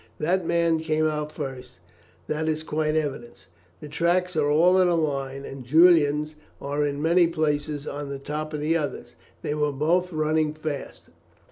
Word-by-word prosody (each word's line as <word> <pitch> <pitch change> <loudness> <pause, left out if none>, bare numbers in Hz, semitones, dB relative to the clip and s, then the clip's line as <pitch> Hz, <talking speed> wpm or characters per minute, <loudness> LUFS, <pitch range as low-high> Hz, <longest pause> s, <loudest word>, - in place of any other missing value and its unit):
That 175 +2 0
man 170 -1 +2
came 155 0 0
out 150 -1 -3
first; 130 -4 -7 0.5
that 155 +1 -2
is 155 0 -2
quite 155 0 -1
evident. 135 -9 -4 0.4
The 150 - -8
tracks 175 +4 0
are 150 -2 +2
all 175 +5 +4
in 180 - +4
a 175 - +2
line, 140 -3 -2
and 135 -1 -8
Julian's 155 +1 +4 0.3
are 145 +1 -2
in 145 -1 -2
many 170 +1 +4
places 150 -2 -1
on 145 0 -5
the 140 - -4
top 150 +2 -5
of 150 -1 -4
the 155 +2 +1
other's. 150 -3 -3 0.3
They 150 - -1
were 150 -1 0
both 170 +6 +1
running 155 -1 0
fast. 155 -2 -6
155 Hz, 170 wpm, -25 LUFS, 145-160 Hz, 0.5 s, all